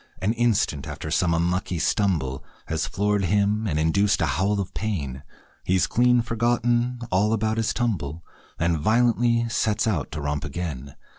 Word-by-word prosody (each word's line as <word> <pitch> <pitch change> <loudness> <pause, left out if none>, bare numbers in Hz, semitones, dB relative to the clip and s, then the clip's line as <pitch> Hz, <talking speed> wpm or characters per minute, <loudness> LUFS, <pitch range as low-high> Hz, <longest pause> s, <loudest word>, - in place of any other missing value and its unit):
An 100 +5 0
instant 115 - 0
after 80 - -6
some 85 +1 +2
unlucky 90 +2 0
stumble 80 -8 0 0.2
Has 80 0 -2
floored 105 0 0
him 105 +3 +1
and 75 -6 -1
induced 95 +6 +2
a - - +2
howl 95 +8 0
of 95 - -4
pain, 75 -12 -3 0.4
He's 95 0 +2
clean 125 0 +3
forgotten 120 +1 0
all 100 +4 +2
about 110 0 0
his 115 -1 +1
tumble 85 - -2 0.3
And 85 -1 +1
violently 115 +4 +2
sets 110 -2 0
out 95 -11 -1
to 75 - -4
romp 75 0 -2
again. 70 -6 -5
100 Hz, 155 wpm, -24 LUFS, 80-115 Hz, 0.4 s, clean